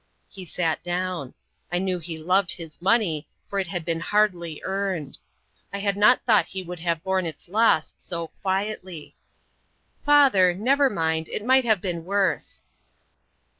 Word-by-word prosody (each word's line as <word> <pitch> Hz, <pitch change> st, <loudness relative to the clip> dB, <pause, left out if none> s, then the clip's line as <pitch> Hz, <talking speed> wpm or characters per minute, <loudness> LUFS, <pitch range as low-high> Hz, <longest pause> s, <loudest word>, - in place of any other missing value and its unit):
He 190 Hz, -3 st, -10 dB
sat 165 Hz, -1 st, -1 dB
down. 175 Hz, -5 st, -3 dB, 0.4 s
I 175 Hz, -, +1 dB
knew 185 Hz, -1 st, -1 dB
he 165 Hz, -1 st, -6 dB
loved 180 Hz, +3 st, +2 dB
his 165 Hz, -3 st, -9 dB
money, 185 Hz, -7 st, +2 dB, 0.2 s
for 200 Hz, -, -2 dB
it 190 Hz, -, -1 dB
had 175 Hz, -2 st, -4 dB
been 165 Hz, -1 st, -1 dB
hardly 175 Hz, -4 st, 0 dB
earned. 190 Hz, -7 st, -3 dB, 0.5 s
I 200 Hz, -, -4 dB
had 200 Hz, 0 st, 0 dB
not 210 Hz, +5 st, +4 dB
thought 220 Hz, -4 st, +4 dB
he 190 Hz, -1 st, -6 dB
would 180 Hz, -1 st, -7 dB
have 165 Hz, -1 st, -1 dB
borne 190 Hz, -2 st, 0 dB
its 160 Hz, -, -8 dB
loss 205 Hz, -4 st, +2 dB
so 170 Hz, -2 st, -5 dB
quietly. 190 Hz, -4 st, -3 dB, 0.9 s
"Father, 265 Hz, -12 st, +5 dB
never 270 Hz, +7 st, +3 dB
mind; 160 Hz, -5 st, -1 dB
it 215 Hz, -, -4 dB
might 260 Hz, 0 st, +4 dB
have 220 Hz, -5 st, +2 dB
been 170 Hz, -3 st, -3 dB
worse." 195 Hz, +2 st, -1 dB
185 Hz, 155 wpm, -24 LUFS, 170-205 Hz, 0.9 s, Father